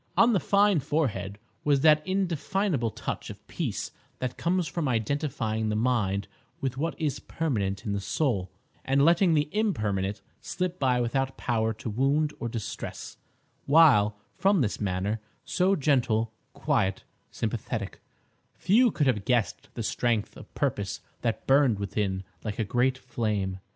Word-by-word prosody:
On 235 0 +6
the 195 - +3
fine 200 +2 +3
forehead 125 -9 -1 0.3
was 145 -2 +3
that 155 0 +6
indefinable 185 - 0
touch - - -5
of - - -11
peace - - -3 0.3
that 130 -1 -3
comes 175 0 0
from 150 +1 -2
identifying 115 -3 -1
the 105 - 0
mind 105 -4 +1 0.3
with 135 -2 -2
what 160 +5 -3
is 150 -5 -1
permanent 105 -10 -2
in 105 - -1
the 100 - -1
soul, 100 - 0 0.3
and 135 +1 +3
letting 170 0 +4
the 150 -1 +2
impermanent 105 - -1 0.2
slip 180 0 -3
by 125 -2 +2
without 130 +3 -1
power 110 -2 0
to 115 - -8
wound 140 +7 +1
or 115 - -3
distress; 115 -2 -6 0.5
while, 135 -9 +6 0.2
from 195 -6 +4
his 105 - -2
manner,—so 105 - -1
gentle, 120 - +1 0.2
quiet, 110 -11 0 0.3
sympathetic,—few 235 +7 -1
could 155 -7 0
have 110 -7 +1
guessed 120 -1 0
the 115 - -3
strength 115 -1 0
of - - -13
purpose - - -1 0.2
that 115 -2 -2
burned 135 -5 +4
within 100 -1 -2 0.2
like 105 -2 -4
a 115 - +1
great 125 +5 +1
flame. 105 -7 -2
125 Hz, 140 wpm, -27 LUFS, 105-155 Hz, 0.5 s, On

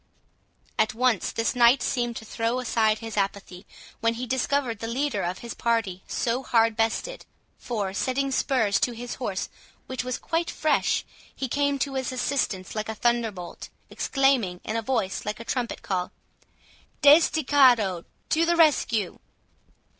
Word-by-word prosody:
At 220 0 +2
once 240 -5 +1
this 230 +2 -1
knight 245 +2 +5
seemed 240 -2 -1
to 220 - -7
throw 230 +3 -1
aside 220 -3 +1
his 225 -1 -7
apathy, 195 -1 -3 0.3
when 230 0 +1
he 245 +2 -4
discovered 260 -2 0
the 225 - -4
leader 245 -2 -1
of 180 +2 -2
his 235 - -5
party 225 -6 -1
so 240 +2 -1
hard 230 -3 +2
bestead; 225 - -1 0.4
for, 205 -6 -3
setting 270 +6 -1
spurs 225 -7 +1
to 245 - +1
his 240 +1 -6
horse, 200 -6 -2 0.4
which 260 -1 -4
was 255 0 -3
quite 330 +1 -2
fresh, 310 -1 +1 0.3
he 270 - -3
came 285 +2 0
to 275 0 -2
his 260 -1 -2
assistance 250 -7 -1
like 215 0 -3
a 220 - -3
thunderbolt, 225 -6 -2 0.2
exclaiming, 265 -10 +1
in 220 - -4
a 230 - 0
voice 220 -5 -1
like 210 +1 -4
a 230 - -8
trumpet 245 -2 -3
call, 180 -2 -2 0.9
"Desdichado, 270 - +5 0.3
to 320 - +3
the 345 - +3
rescue!" 245 - +2
235 Hz, 155 wpm, -26 LUFS, 215-265 Hz, 0.9 s, knight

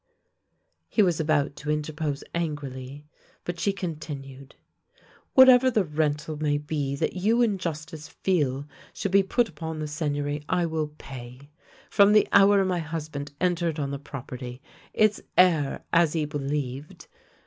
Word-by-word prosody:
He 215 - +3
was 175 -4 +1
about 150 -2 +1
to 150 - -6
interpose 150 -1 -2
angrily, 145 -4 -4 0.4
but 175 -1 -5
she 200 - +2
con 180 -5 -4
tinued: 135 -3 -9 0.4
" - - -30
Whatever 260 -1 +8
the 220 -5 +2
rental 150 -1 -1
may 145 -1 +1
be 145 -2 -2
that - - -1
you 220 +6 +2
in 210 -5 +1
jus^ 160 -4 -3
tice 160 -2 -10
feel 145 -6 -1 0.3
should 200 - -2
be 200 +1 +6
put 230 +5 +1
upon 160 -2 -6
the 155 - -3
Seigneury 145 -1 -2
I 180 -2 +2
will 160 -2 -1
pay 130 +1 -10 0.2
— - - -26
from 200 +1 +6
the 210 - +5
hour 200 0 +6
my 180 -2 0
husband 155 -3 -5
entered 170 -3 0
on 140 -2 -2
the 140 - -4
property, 125 -3 -8 0.3
its 215 -1 +2 0.2
heir, 160 -6 +3
as 165 -2 +4
he 160 -2 0
believed. 145 -1 -4
155 Hz, 160 wpm, -26 LUFS, 145-180 Hz, 0.4 s, Whatever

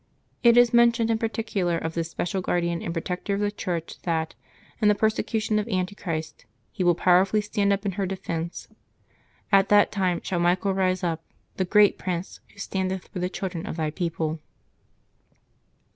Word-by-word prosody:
It 235 -1 +6
is 245 -1 +6
mentioned 235 -1 +4
in 225 - +1
particular 220 -6 -1
of 160 0 -4
this 165 0 -2
special 185 +3 -2
guardian 170 -1 -1
and 170 - -4
protector 180 +4 -3
of - - -2
the 205 0 +1
Church 175 -5 -4
that, 160 -2 -1 0.5
in 210 - +4
the 210 - +5
perse 220 +1 +2
cution 215 -1 -1
of 210 - -3
Antichrist, 180 - -3 0.2
he 185 - -2
will 175 -1 +4
powerfully 185 +4 +4
stand 205 -1 0
up 200 +1 0
in 200 - +1
her 195 0 -2
defence: 170 -3 -4
^' - - -25 0.8
At 195 -1 +5
that 205 0 +5
time 185 -4 0
shaU 180 - -2
Michael 180 +3 +2
rise 185 0 0
up, 165 -2 -1 0.3
the 185 - +1
great 210 +2 +4
prince, 180 0 -4
who - - -25
standeth 190 -2 -3
for 185 - -6
the 180 +1 -1
children 185 -3 -5
of - - -4
thy 155 -2 -1
people." 165 -2 -2
185 Hz, 180 wpm, -25 LUFS, 170-205 Hz, 0.8 s, It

